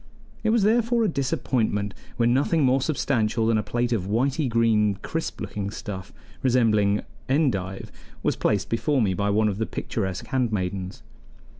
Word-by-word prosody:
It 220 - +2
was 225 -2 +3
therefore 230 +2 +3
a - - +3
disappointment 125 - -1 0.2
when 120 0 +3
nothing 145 +4 +2
more 130 +1 +3
substantial 120 -6 0
than 110 -1 +3
a - - +1
plate 120 +3 -1
of 100 -6 -1
whitey 130 +6 +1
green, 110 -3 +3
crisp 165 0 -3
looking 100 -1 -4
stuff 100 -2 -7 0.3
resembling 110 -6 +3 0.3
endive, 100 - 0 0.3
was - - +1
placed 100 -2 0
before 130 +3 +1
me 95 -3 +1
by 100 +2 0
one 110 +2 +3
of 100 -1 -2
the 110 - -1
picturesque 95 -4 -3
handmaidens. 100 -7 -2
115 Hz, 155 wpm, -25 LUFS, 100-135 Hz, 0.3 s, was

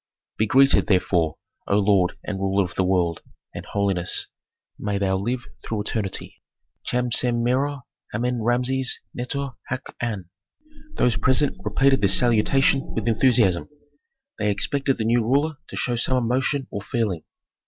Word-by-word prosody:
"Be 110 - +1
greeted, 135 +5 +4
therefore, 90 -5 +1 0.3
O 100 - +2
lord 100 -3 +2
and 95 -2 -4
ruler 95 +1 +1
of 90 - -8
the 95 - 0
world, 90 -3 0 0.3
and, - - -7
holiness, 100 -3 0 0.5
may 105 -1 -2
thou 95 -1 +1
live 120 +6 -2 0.2
through 110 -2 -3
eternity 105 -3 -4 0.4
Cham 125 0 -1
Sem 120 -1 +2
Merer 135 +3 0 0.3
Amen 120 +2 -1
Rameses 125 +3 +1
Neter 140 +3 -3 0.2
haq 130 0 -5
an." 105 -7 -3 0.7
Those 120 -4 +2
present 130 +5 +2
repeated 135 0 +2
this 100 -1 +5
salutation 125 +4 +3
with 110 0 -2
enthusiasm. 110 -6 +3 0.7
They 105 - +1
expected 135 +7 0
the 110 - -2
new 120 +1 +3
ruler 140 +6 +1
to - - -9
show 120 - -1
some 125 +2 +1
emotion 130 +3 0
or 100 - -4
feeling. 105 -6 -2
115 Hz, 145 wpm, -23 LUFS, 100-130 Hz, 0.7 s, this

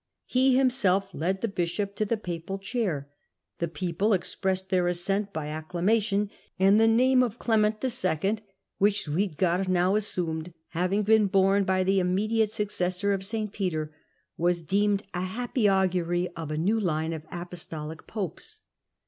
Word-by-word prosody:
He 255 0 +3
himself 200 -8 +2
led 185 +5 -1
the 230 - 0
bishop 195 +1 -2
to 215 - +1
the 225 +2 0
papal 180 -1 -5
chair, 195 - -2 0.5
the 170 - 0
people 175 +6 0
expressed 190 +1 -1
their 180 -2 +2
assent 195 +4 0
by 155 -5 -4
acclamation, 195 +6 0 0.3
and 195 +3 +5
the 225 - +5
name 255 +3 +4
of 240 -2 -1
^JJ - - -15
leme - - +5 0.7
nt - - -14
II. - - -31 0.4
which 205 0 +2
Suidger 180 +3 0
now 185 +1 +2
assumed, 175 -5 -1
having 185 +5 0
been 215 -1 +4
"^bome 195 +1 +3
by 185 0 +2
the 195 +1 +2
immediate 210 +4 +1
successor 200 -2 0
of 195 -1 -2
St. 210 0 -3
Peter, 155 -6 -2 0.4
was 175 0 +1
deemed 200 +3 +1
a 180 - -2
happy 225 +3 0
augury 180 -2 +1
of 160 -3 -7
a 155 - -2
new 205 +8 +1
line 160 -4 -1
of 155 -1 -7
apostolic 165 -3 -7
popes. 220 - -5
190 Hz, 155 wpm, -27 LUFS, 175-210 Hz, 0.7 s, and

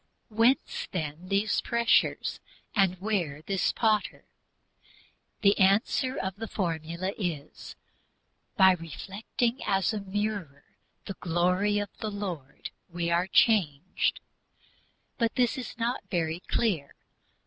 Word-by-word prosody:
Whence, 230 +4 +2
then, 160 0 -4
these 200 +2 +1
pressures, 235 -1 +2 0.3
and 190 -3 +2
where 175 -8 -2
this 195 +1 +1
Potter? 215 -2 0 1.2
The 200 -1 +5
answer 210 +7 +3
of 190 0 -3
the 225 +1 -5
formula 170 0 -2
is 160 -7 -5 0.8
"By 190 -2 +8
reflecting 195 - -3
as 195 +1 +1
a 215 - -2
mirror 200 -7 -3 0.4
the 195 - -4
glory 180 +4 +1
of 205 -1 -3
the 215 - -2
Lord 185 -10 -6 0.2
we 170 0 -2
are 175 +2 +2
changed." 185 -7 +2 1.0
But 230 -2 +1
this 245 -2 +2
is 255 -3 -6
not 240 +2 -1
very 165 -2 -1
clear. 175 -12 0
195 Hz, 115 wpm, -28 LUFS, 170-215 Hz, 1.2 s, By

